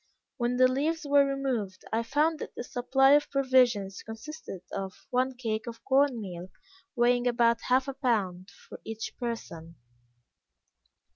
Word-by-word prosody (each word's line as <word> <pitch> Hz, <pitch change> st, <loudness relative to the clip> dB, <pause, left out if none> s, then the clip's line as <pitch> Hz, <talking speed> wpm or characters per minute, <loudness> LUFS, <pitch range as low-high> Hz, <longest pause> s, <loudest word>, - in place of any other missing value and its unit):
When 245 Hz, 0 st, 0 dB
the 255 Hz, 0 st, +6 dB
leaves 300 Hz, +5 st, -1 dB
were 285 Hz, 0 st, +5 dB
removed, 255 Hz, -9 st, -3 dB
I 225 Hz, -, +2 dB
found 300 Hz, +6 st, +1 dB
that -, -, -7 dB
the -, -, -5 dB
supply 265 Hz, +3 st, +2 dB
of 290 Hz, +1 st, +4 dB
provisions 250 Hz, -8 st, +2 dB
consisted 225 Hz, -, -9 dB
of 195 Hz, -1 st, -6 dB
one 255 Hz, +1 st, +1 dB
cake 225 Hz, -2 st, -3 dB
of 230 Hz, -1 st, -8 dB
corn 270 Hz, -2 st, +3 dB
meal, 180 Hz, -3 st, -7 dB, 0.5 s
weighing 245 Hz, 0 st, +3 dB
about 235 Hz, -1 st, +3 dB
half 255 Hz, +2 st, +3 dB
a 275 Hz, -, -3 dB
pound, 200 Hz, -9 st, -1 dB
for -, -, -14 dB
each 225 Hz, 0 st, -6 dB
person. 170 Hz, -9 st, -6 dB
245 Hz, 145 wpm, -28 LUFS, 220-270 Hz, 0.5 s, the